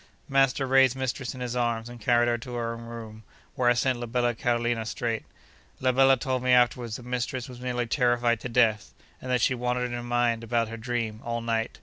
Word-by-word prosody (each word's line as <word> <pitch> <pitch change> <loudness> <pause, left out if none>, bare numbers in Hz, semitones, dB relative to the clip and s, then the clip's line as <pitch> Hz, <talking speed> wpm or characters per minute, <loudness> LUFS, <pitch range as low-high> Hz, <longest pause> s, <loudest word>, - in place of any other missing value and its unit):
Master 135 0 +2
raised 130 -1 +4
mistress 130 0 -3
in 130 - -8
his 125 -1 -3
arms, 120 -2 -1
and 120 -1 -10
carried 120 +2 +3
her 120 0 +1
to 125 +1 -7
her 115 -1 -2
own 115 - -8
room, 115 -2 -9 0.3
where 125 -1 +2
I - - +5
sent 125 0 0
la 120 - -4
bella 120 0 +1
Carolina 120 0 0
straight. 115 0 -3 0.6
La 130 0 +2
bella 135 +1 +5
told 130 +1 -2
me 125 0 +3
afterwards 120 -2 +2
that 125 - -9
mistress 125 +1 -3
was 125 -2 -10
nearly 125 -1 -1
terrified 120 -2 +2
to 125 - -6
death, 115 -3 +2 0.3
and 130 - -7
that 125 -2 +2
she 130 - +3
wandered 125 0 -1
in 120 - -4
her 120 - -3
mind 120 -1 0
about 115 -1 0
her 115 - -6
dream, 115 -1 -3
all 120 0 -2
night. 115 -1 -2
120 Hz, 225 wpm, -27 LUFS, 115-125 Hz, 0.6 s, I